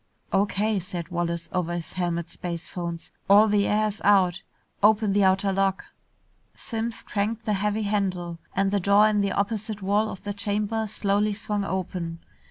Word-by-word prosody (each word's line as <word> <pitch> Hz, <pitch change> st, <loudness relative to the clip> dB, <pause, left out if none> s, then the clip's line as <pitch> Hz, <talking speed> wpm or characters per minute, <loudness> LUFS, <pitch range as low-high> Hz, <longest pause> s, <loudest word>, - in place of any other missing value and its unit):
"O.K.," 205 Hz, +1 st, +1 dB
said 175 Hz, -2 st, -6 dB
Wallace 170 Hz, -1 st, -2 dB
over 175 Hz, -2 st, -1 dB
his 170 Hz, -2 st, -6 dB
helmet 170 Hz, -2 st, -2 dB
spacephones. 170 Hz, -1 st, -5 dB, 0.2 s
"All 205 Hz, +2 st, +7 dB
the 205 Hz, -1 st, +2 dB
air's 215 Hz, 0 st, 0 dB
out. 190 Hz, -3 st, +4 dB, 0.4 s
Open 210 Hz, 0 st, +4 dB
the 205 Hz, 0 st, +3 dB
outer 190 Hz, +1 st, +3 dB
lock." 195 Hz, 0 st, 0 dB, 0.7 s
Simms 225 Hz, 0 st, -4 dB
cranked 215 Hz, +3 st, -2 dB
the 215 Hz, -, +1 dB
heavy 210 Hz, +2 st, 0 dB
handle, 185 Hz, -5 st, -1 dB, 0.2 s
and 195 Hz, 0 st, +2 dB
the 200 Hz, -, +2 dB
door 200 Hz, +3 st, +5 dB
in 210 Hz, -1 st, +2 dB
the 200 Hz, -, 0 dB
opposite 210 Hz, 0 st, -2 dB
wall 205 Hz, +3 st, +2 dB
of 190 Hz, -, -8 dB
the 205 Hz, -, -3 dB
chamber 210 Hz, +2 st, -1 dB
slowly 205 Hz, 0 st, 0 dB
swung 205 Hz, 0 st, -2 dB
open. 180 Hz, -3 st, -3 dB
200 Hz, 160 wpm, -25 LUFS, 185-210 Hz, 0.7 s, All